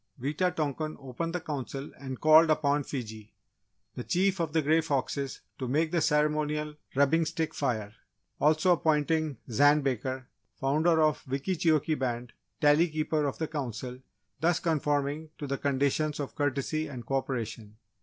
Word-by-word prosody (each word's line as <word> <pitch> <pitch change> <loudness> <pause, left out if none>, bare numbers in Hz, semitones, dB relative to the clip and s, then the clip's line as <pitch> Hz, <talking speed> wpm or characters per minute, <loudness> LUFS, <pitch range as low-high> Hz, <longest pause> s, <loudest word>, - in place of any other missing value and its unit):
Wita 155 +8 0
tonkan 155 0 -2
opened 140 +6 -4
the - - 0
Council 140 -3 -5
and 130 -2 -6
called 155 +1 +7
upon 145 -2 +2
Fiji, 110 -6 -7 0.6
the 125 - -5
Chief 190 +4 +1
of 165 -3 -1
the 160 0 +1
Grey 160 +3 +4
Foxes, 140 -2 -2 0.2
to 130 - -3
make 155 +5 +1
the 170 -2 +1
ceremonial 150 0 +1 0.2
rubbing 140 +4 +4
stick 160 0 -2
fire, 110 -7 -2 0.5
also 155 +4 +4
appointing 155 -3 +1
Zan 145 +6 +5
Baker, 130 -1 -2 0.3
Founder 155 +5 +2
of 155 -2 +1
Wickeecheokee 155 +2 +1
Band, 120 -2 -3 0.3
Tally 150 +3 +5
Keeper 155 -1 0
of 135 - -3
the 160 - -2
Council, 130 -4 -5 0.4
thus 170 +1 +2
conforming 150 -1 0
to 145 - -5
the 140 -1 -3
conditions 140 +2 0
of 140 - -4
courtesy 145 +2 -1
and 125 -5 -8
co 135 +3 0
operation. 115 -5 -4
145 Hz, 150 wpm, -29 LUFS, 135-155 Hz, 0.6 s, called